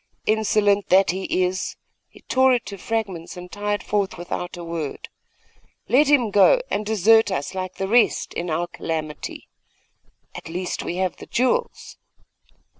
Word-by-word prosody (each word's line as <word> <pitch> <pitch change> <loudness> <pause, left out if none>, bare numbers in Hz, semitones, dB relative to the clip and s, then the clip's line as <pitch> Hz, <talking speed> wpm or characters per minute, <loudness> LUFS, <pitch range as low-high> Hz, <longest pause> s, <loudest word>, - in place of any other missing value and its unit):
'Insolent 210 -2 +2
that 190 -1 +5
he 185 0 -1
is! 185 +1 -2 0.3
he - - -18
tore 260 0 +3
it 240 - -3
to 200 - -7
fragments 195 -6 -4
and 180 0 -9
tied 205 -1 -2
forth 200 -2 -1
without 175 +1 -5
a 175 - -7
word.' 165 -4 -5 0.8
'Let 270 +6 +4
him 255 -7 +3
go, 205 - +6
and 210 - 0
desert 220 +1 +4
us 165 -5 -3
like 185 -1 -5
the 195 - -3
rest, 235 +3 +2
in 175 +1 -3
our 165 +2 0
calamity!' 160 -3 -5 0.9
'At - - -9
least, 180 +2 -3
we 175 - -4
have 185 -1 -1
the - - -11
jewels. 250 +1 -1
195 Hz, 155 wpm, -23 LUFS, 175-220 Hz, 0.9 s, go